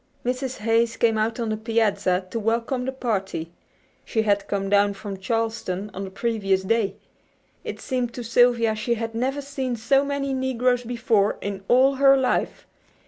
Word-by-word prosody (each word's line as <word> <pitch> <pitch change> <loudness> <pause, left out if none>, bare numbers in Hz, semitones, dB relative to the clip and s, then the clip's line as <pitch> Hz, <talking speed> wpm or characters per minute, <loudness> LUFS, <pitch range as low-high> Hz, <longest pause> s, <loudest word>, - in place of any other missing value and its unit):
Mrs. 255 +1 -2
Hayes 230 +1 +2
came 225 -2 +2
out 225 +2 -1
on 230 -2 -1
the 215 - -1
piazza 205 -5 +1
to 230 - -2
welcome 230 +3 -1
the 265 - -1
party. 195 -10 -3 0.5
She 220 -2 0
had 205 -2 +1
come 195 -1 -2
down 200 0 +3
from 195 -1 -7
Charleston 210 -2 -2
on 195 +1 -5
the - - -7
previous 195 -2 0
day. 200 -1 +1 0.7
It - - -6
seemed 250 -3 -2
to 245 - -5
Sylvia 235 -1 +3
she 235 +2 -1
had 225 0 -4
never 265 +5 -1
seen 270 -3 -3
so 270 +5 +2
many 280 -1 -2
negroes 255 -1 +1
before 230 -4 +1
in 195 -1 -5
all 265 +2 +4
her 275 0 +6
life. 260 -1 -1
230 Hz, 170 wpm, -24 LUFS, 205-250 Hz, 0.7 s, her